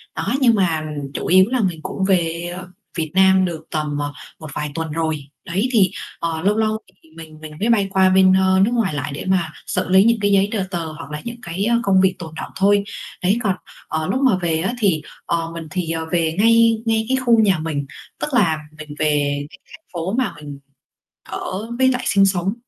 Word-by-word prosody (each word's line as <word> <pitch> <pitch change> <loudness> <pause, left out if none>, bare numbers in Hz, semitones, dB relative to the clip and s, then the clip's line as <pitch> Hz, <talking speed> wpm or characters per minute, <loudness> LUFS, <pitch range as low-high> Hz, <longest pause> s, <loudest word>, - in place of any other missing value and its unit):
đó, - - -2
nhưng 235 -3 +5
mà 170 -6 +1 0.3
chủ - - -4
yếu 185 +1 +6
là 255 0 0
mình 180 -5 -1
cũng 195 - -4
về, 170 -2 0
ờ, 185 0 -8 0.3
Việt 160 -2 -2
Nam 190 0 +5
được 165 -3 -5
tầm, 150 -2 -2
ờ, 145 0 -3 0.3
một 155 - -9
vài 150 0 -3
tuần 165 -1 -3
rồi. 160 -2 -2 0.2
Đấy, 195 +8 -1
thì, 195 -7 +4 0.3
ờ, 165 -1 -2
lâu 205 +4 +2
lâu 220 0 +1 0.3
thì 160 - -22
mình 160 -1 -11
mình 155 -1 -9
mới 220 - 0
bay 210 -4 +3
qua 190 0 +4
bên, 185 0 +5
ờ, 190 0 +3
nước 230 - -1
ngoài 225 -9 +1
lại 145 0 -3
để - - -6
mà 185 -4 +1 0.2
xử 185 - -2
lý 190 +1 +6
những 230 +1 +3
cái 205 0 +2
giấy 200 0 +3
tờ 210 -4 -1
tờ, 170 -3 -2
hoặc 155 -2 -8
là 150 0 -5
những 235 0 -6
cái, 175 +4 -3
ơ, 235 +1 +3
công 190 -3 +4
việc 190 0 +3
tồn 160 -3 -8
đọng - - -6
thôi. 200 +1 +3 0.4
Đấy, 195 +5 +3
còn, 195 -4 +1 0.3
ờ, 160 0 -2
lúc 260 - 0
mà 255 -7 +4
về 165 -2 0
á 190 +7 -1
thì, 185 -9 +2 0.2
ờ, 165 -1 -1
mình 165 -1 -7
thì, 180 -3 -2
ờ, 160 0 -2
về 165 -2 +1
ngay 230 0 +4
ngay 225 -1 +1
cái 265 - +2
khu 240 -3 +3
nhà 195 -6 +3
mình, 155 -3 -3 0.3
tức - - -2
là 175 -10 +3 0.2
mình 155 -1 -9
về 145 -2 +1
cái - - -15
thành 320 - -14
phố 175 +3 -3
mà 260 - 0
mình 145 -2 -9 0.7
ở 205 +5 -5
với 260 - +5
lại 255 -1 +1
sinh 195 -1 +4
sống 190 0 0
185 Hz, 230 wpm, -20 LUFS, 160-205 Hz, 0.7 s, yếu